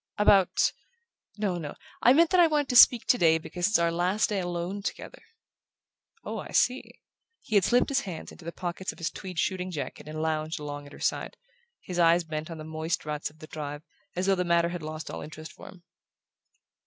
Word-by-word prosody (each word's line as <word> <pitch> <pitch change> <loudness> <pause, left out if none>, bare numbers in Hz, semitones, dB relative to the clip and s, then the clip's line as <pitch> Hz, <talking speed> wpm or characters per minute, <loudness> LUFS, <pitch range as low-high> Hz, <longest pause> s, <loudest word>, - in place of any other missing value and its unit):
"About? 200 -2 +4 0.7
No, 195 -4 -1
no: 150 -3 -6 0.3
I 245 - +6
meant 335 +4 +4
that 370 - +4
I 345 - +7
wanted 295 -3 0
to 250 - -1
speak 240 -1 +8
today 165 -9 +4
because 175 +2 -2
it's 210 - +3
our 170 0 +2
last 180 +7 +1
day 205 -2 0
alone 175 +2 -3
together." - - -6 1.0
"Oh, - - -4
I - - -8
see." 255 +1 0 0.4
He - - -9
had 200 -2 +5
slipped 245 +5 +3
his 275 -1 +2
hands 185 -8 -7
into - - -14
the 170 - -5
pockets 180 +2 -4
of - - -16
his 165 - -3
tweed 185 -2 -8
shooting 185 +2 -1
jacket 150 -4 -6
and 155 0 -6
lounged 155 0 -1
along 145 -1 -6
at 140 - -14
her - - -12
side, - - -2 0.4
his 180 -1 -5
eyes 170 +1 +5
bent 155 0 -5
on 165 - -7
the 155 - -8
moist 160 +1 -3
ruts 150 0 -3
of 150 - -22
the 155 - -10
drive, 145 -1 -6 0.3
as 180 +1 -1
though 195 - +4
the 180 -1 0
matter 170 -1 +2
had 175 -1 -5
lost 155 +1 -6
all - - -6
interest 155 +1 -9
for - - -13
him. 180 -2 -14
175 Hz, 215 wpm, -28 LUFS, 155-195 Hz, 1.0 s, speak